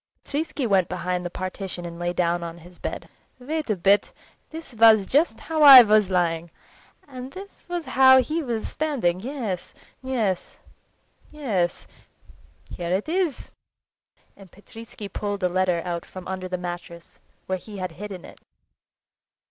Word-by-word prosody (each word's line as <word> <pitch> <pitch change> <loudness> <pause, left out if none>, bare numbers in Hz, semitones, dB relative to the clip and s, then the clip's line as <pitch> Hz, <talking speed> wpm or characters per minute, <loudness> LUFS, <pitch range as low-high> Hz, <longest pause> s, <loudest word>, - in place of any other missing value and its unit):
Petritsky 290 -2 -3
went 195 -5 +2
behind 180 0 -2
the 175 - -4
partition 185 0 -6
and 170 0 -8
lay 175 0 -1
down 175 -1 0
on 170 0 -6
his 175 +1 -16
bed. - - -5 0.3
"Wait 300 +3 -4
a 215 - +2
bit! 195 +3 +2 0.4
This 320 -4 -10
was 220 -3 +6 0.4
how 320 -1 -2
I 275 -4 +12
was 210 -2 +3
lying, 170 -2 0 0.6
and 260 -1 -9
this 390 -1 -12
was 350 -2 -3
how 260 0 +6
he 310 +6 -1
was 235 -6 -3
standing. 255 - -1
Yes—yes—yes.... 230 -2 -4 2.2
Here 175 -1 -4
it 200 - -3
is!"—and 320 - -6
Petritsky 220 +1 -11
pulled 205 -1 -4
a 180 - +2
letter 180 -2 0
out 170 -1 -4
from 185 -1 -10
under 190 0 -4
the 180 0 -3
mattress, 175 -1 -8 0.3
where 185 0 -2
he 205 +2 -11
had 185 -2 -4
hidden 190 +1 -8
it. - - -14
195 Hz, 140 wpm, -24 LUFS, 180-260 Hz, 2.2 s, I